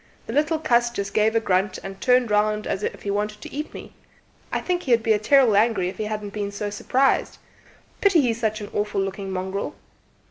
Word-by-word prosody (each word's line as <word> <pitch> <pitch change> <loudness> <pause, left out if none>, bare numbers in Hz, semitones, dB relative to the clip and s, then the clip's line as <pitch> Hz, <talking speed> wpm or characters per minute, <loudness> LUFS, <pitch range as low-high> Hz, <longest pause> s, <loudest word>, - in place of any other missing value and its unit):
The - - -6
little 310 +2 +2
cuss 240 -5 +2
just 200 -4 -4
gave 220 +1 +2
a - - +5
grunt, 190 -2 0
and 195 0 -8
turned 250 -3 +3
round 210 0 +2
as 195 - -2
if - - -4
he 200 - -2
wanted 210 +1 -2
to - - -9
eat 300 +2 -4
me. - - -10 0.6
I - - 0
think 355 -1 -1
he'd 255 - +1
'a' - - +7
been 220 -2 +1
terrible 245 0 +4
angry 205 -4 +2
if - - -9
he 215 - -1
hadn't 210 -1 -4
been 205 -1 -3
so 205 0 -4
s'prised. 260 +6 +1 0.6
Pity 395 -4 +5
he's 230 -4 0
such 215 -1 -1
an 205 - -7
awful 205 -1 -1
looking 195 0 -3
mongrel." 190 +1 -3
210 Hz, 215 wpm, -23 LUFS, 200-240 Hz, 0.6 s, a